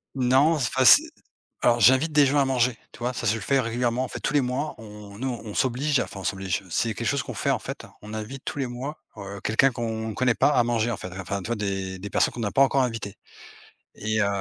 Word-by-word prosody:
Non, 135 +5 +4
enfin, 130 -3 0
c'est 300 - +9 0.6
alors, 120 0 +4
j'invite 130 +8 +5
des 150 -1 +5
gens 145 +2 +1
à 140 - +3
manger. 125 -2 +1
Tu - - -15
vois? 125 +1 -2
Ça, - - -5
je 105 - +3
le 115 - -5
fais 135 +7 +2
régulièrement. 120 +1 0
En - - -3
fait, - - -7
tous - - -2
les 145 - +4
mois, 130 +4 -2
on 105 -2 -11
nous, 130 +3 -2
on 105 -2 -7
s'oblige, 135 +3 +1
enfin, 100 - -4
on - - -8
s'oblige. 95 +1 -2
C'est 115 +7 0
quelque 115 +3 -4
chose 140 -1 0
qu'on - - -7
fait, - - -2
en - - +3
fait, - - -7 0.2
on 105 +1 -9
invite 110 +5 -6
tous - - -4
les 130 - -1
mois, 130 +5 -6 0.2
heu, 100 0 -8
quelqu'un 130 +5 +3
qu'on 110 -2 -4
connaît 125 +1 +1
pas - - +3
à 120 - +3
manger, 120 -1 0
en 110 - -3
fait. 90 - -7
Enfin, 100 +2 -3
tu - - -7
vois? 120 - -1
Des 95 -3 -3
des 100 +2 -7
personnes - - +2
qu'on 120 - -5
a 100 - -1
pas - - +2
encore 135 0 +3
invitées 115 -5 -4 0.8
et 110 +1 -1
heu 100 - +2
120 Hz, 260 wpm, -25 LUFS, 105-130 Hz, 0.8 s, c'est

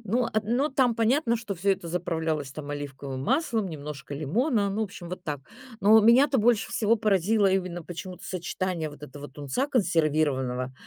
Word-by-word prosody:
Ну, 235 +5 +1
ат 215 -1 -1
ну, 245 +7 +1
там 260 -3 +2
понятно, 235 +2 +2
что 220 -3 -5
всё 195 +3 +2
это 185 -3 -5
заправлялось 160 -4 -2
там 145 -1 -7
оливковым 140 -2 -5
маслом, 230 - 0
немножко 145 -3 -7
лимона, 200 - +1
ну, 205 +3 -2
в - - +1
общем, 185 -4 -9
вот 180 +1 -6
так. 150 -4 -3 0.4
Но 215 +2 +7
меня-то 260 +5 +5
больше 230 0 +2
всего 225 +1 +2
поразило 205 0 +2
именно 185 -2 -1
почему-то 180 +2 -8
сочетание 180 -2 -3
вот 145 - -14
этого 145 -1 -9
тунца 145 - -2
консервированного 145 - +1
185 Hz, 170 wpm, -27 LUFS, 150-225 Hz, 0.4 s, Но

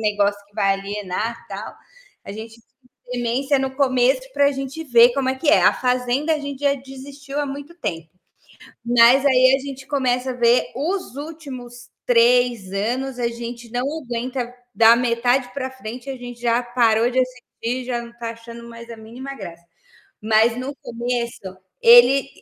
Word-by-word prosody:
negócio 205 -1 0
que 205 - -33
vai 195 -1 +2
alienar, 205 +3 -4
tal. - - -7 0.5
A - - -8
gente 220 +1 -9
finge - - -36 0.6
demência 265 +4 +1
no 265 0 -3
começo 260 -1 +2
pra 285 +1 +3
gente 275 +4 -6
ver 240 -3 +6
como 270 -2 0
é 260 - +1
que 290 +3 -3
é. 310 - +6
A - - +6
Fazenda 250 +5 0
a - - -2
gente 280 -1 -6
já 280 -1 +2
desistiu 275 +1 -8
há 290 - -2
muito 285 +4 -8
tempo. 165 - -5 0.8
Mas 240 +3 +5
aí 255 -1 +5
a - - -5
gente 270 -1 -8
começa 260 -2 0
a - - -2
ver 240 0 +3
os 335 0 -3
últimos 260 -6 -9 0.2
3 240 -4 +3
anos, 245 +6 -2
a 240 -1 0
gente 235 0 -8
não 245 +2 -2 0.2
aguenta, 245 0 -4 0.2
da 230 0 +7
metade 245 +1 +1
pra 260 -2 -3
frente 250 0 -9
a 265 - -5
gente 245 -1 -10
já 240 0 +1
parou 240 -1 +2
de 255 - -1
assistir, 250 0 -4
já 240 -2 -2
não 235 0 -11
tá 230 -1 -4
achando 230 +1 -11
mais 235 0 -11
a 230 - -8
mínima 240 +5 -9
graça. 170 -7 -10 0.6
Mas 220 +2 +3
no 265 +3 -5
começo, 235 -6 -4 0.3
ele 245 +4 +7
245 Hz, 170 wpm, -21 LUFS, 235-265 Hz, 0.8 s, da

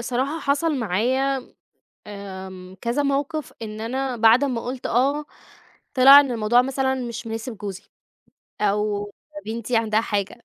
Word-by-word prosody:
صراحة 260 +6 -2
حصل 295 +3 +1
معايا 255 +6 0 0.5
آمم 190 -2 -9
كذا 235 +5 0
موقف 285 +1 -2
إن 215 0 -6
أنا 255 +3 -2
بَعد 230 +4 +5
أمّا 250 -4 -1
قُلت 250 +1 -5
آه، 280 +5 +1 0.7
طِلِع 275 +1 +9
إن 275 -3 +1
الموضوع 235 +2 +3
مثلًا 265 0 0
مش 240 -2 -5
مناسب 225 0 -5
جوزي، 195 -2 -6 0.8
أو 205 0 0 0.4
بنتي 230 +2 -2
عندها 220 -1 +2
حاجة. 205 +1 -3
240 Hz, 130 wpm, -23 LUFS, 215-270 Hz, 0.8 s, طِلِع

